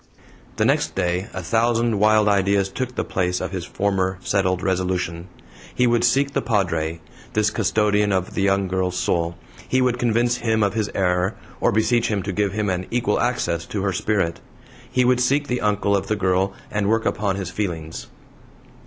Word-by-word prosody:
The - - +1
next - - +1
day 90 +1 -1
a 95 - -6
thousand 115 +2 +1
wild 110 0 +4
ideas 100 -1 +2
took 125 +3 -4
the - - -1
place 90 -1 -1
of - - -4
his 90 -3 -4
former 95 -2 -1
settled 95 -2 0
resolution. 90 -2 -1 0.5
He 125 - +3
would 120 -1 +2
seek 135 +4 +2
the 140 - +1
Padre, 85 -8 -1 0.3
this 105 0 +2
custodian 105 -1 +1
of 95 -1 -1
the - - -1
young 95 0 +2
girl's 90 0 -1
soul; 85 -1 0 0.3
he 130 - +2
would 125 -1 +1
convince 120 +1 +2
HIM 110 -2 +1
of 100 -2 +1
his 110 -2 -1
error, 90 +1 +1 0.2
or - - +2
beseech 115 +3 +2
him 100 -3 -1
to 100 - -3
give 100 0 0
him 105 0 -1
an 90 -1 -2
equal 120 0 0
access 120 -9 0
to 100 -2 -3
her 95 -1 0
spirit! 95 -3 0 0.5
He 125 -1 +2
would 125 0 +3
seek 140 +4 +1
the 125 -1 -1
uncle 105 -1 +1
of 100 - -1
the 110 - +1
girl, 95 0 +1 0.2
and 105 -1 0
work 110 0 +1
upon 100 -2 0
his 95 -2 -4
feelings. 80 -6 -4
100 Hz, 190 wpm, -22 LUFS, 95-115 Hz, 0.5 s, wild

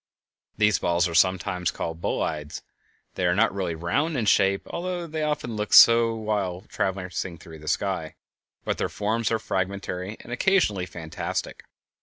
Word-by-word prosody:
These 105 -1 +3
balls 85 +1 +2
are 85 - -6
sometimes 90 0 +2
called 80 0 -5
bolides. 75 -3 -3 0.5
They 90 - 0
are 90 - +2
not 110 +1 +3
really 95 -4 -2
round 140 - -1
in 115 - 0
shape, 100 -1 +3
although 175 0 -3
they 160 -1 -4
often 150 -7 -2
look 105 0 -3
so 115 -1 +8
while 105 -5 -2
traversing 95 -3 -3
the 80 -2 -12
sky, 90 -5 -1 0.5
but - - -1
their - - 0
forms 110 +2 -1
are 115 - +2
fragmentary, 95 0 -3
and - - -12
occasionally 125 - +2
fantastic. 80 -2 -5
95 Hz, 150 wpm, -25 LUFS, 90-115 Hz, 0.5 s, so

